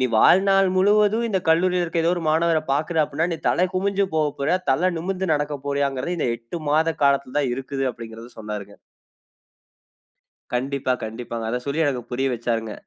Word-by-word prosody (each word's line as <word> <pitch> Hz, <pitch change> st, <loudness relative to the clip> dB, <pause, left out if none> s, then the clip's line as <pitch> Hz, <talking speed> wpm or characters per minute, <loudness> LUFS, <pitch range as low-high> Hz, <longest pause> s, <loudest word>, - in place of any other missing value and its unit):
நீ 130 Hz, -, +3 dB
வாழ்நாள் 195 Hz, -, +5 dB
முழுவதும் 210 Hz, +4 st, +3 dB
இந்த 195 Hz, -, +1 dB
கல்லூரியில 180 Hz, +2 st, +3 dB
இருக்குற, 165 Hz, 0 st, -1 dB
ஏதோ 170 Hz, -, +3 dB
ஒரு 170 Hz, -, -3 dB
மாணவர 165 Hz, 0 st, +2 dB
பாக்குற 155 Hz, +3 st, +1 dB
அப்டினா, 150 Hz, +3 st, -1 dB
நீ 165 Hz, -, -2 dB
தல 180 Hz, -, +2 dB
குமிஞ்சு 200 Hz, +1 st, +1 dB
போக 155 Hz, -1 st, +2 dB
போறயா? 140 Hz, +6 st, +2 dB
தல 175 Hz, +8 st, +2 dB
நிமிந்து 190 Hz, +2 st, -2 dB
நடக்க 145 Hz, 0 st, -2 dB
போறியாங்கிறது 140 Hz, +4 st, -1 dB
இந்த 125 Hz, -, 0 dB
8 115 Hz, +8 st, -7 dB
மாத 160 Hz, +2 st, +2 dB
காலத்துல 140 Hz, -1 st, +1 dB
தான் 135 Hz, -3 st, 0 dB
இருக்குது" 135 Hz, +1 st, -4 dB
அப்டிங்கிறத 115 Hz, +1 st, -10 dB
சொன்னாருங்க. 105 Hz, -2 st, -6 dB, 1.8 s
கண்டிப்பா, 130 Hz, +1 st, -1 dB
கண்டிப்பாங்க. 115 Hz, 0 st, -6 dB
அத 125 Hz, -, -1 dB
சொல்லி 140 Hz, +3 st, -2 dB
எனக்கு 130 Hz, -3 st, -1 dB
புரிய 135 Hz, +2 st, 0 dB
வச்சாருங்க. 115 Hz, -2 st, -2 dB
145 Hz, 165 wpm, -23 LUFS, 125-180 Hz, 1.8 s, வாழ்நாள்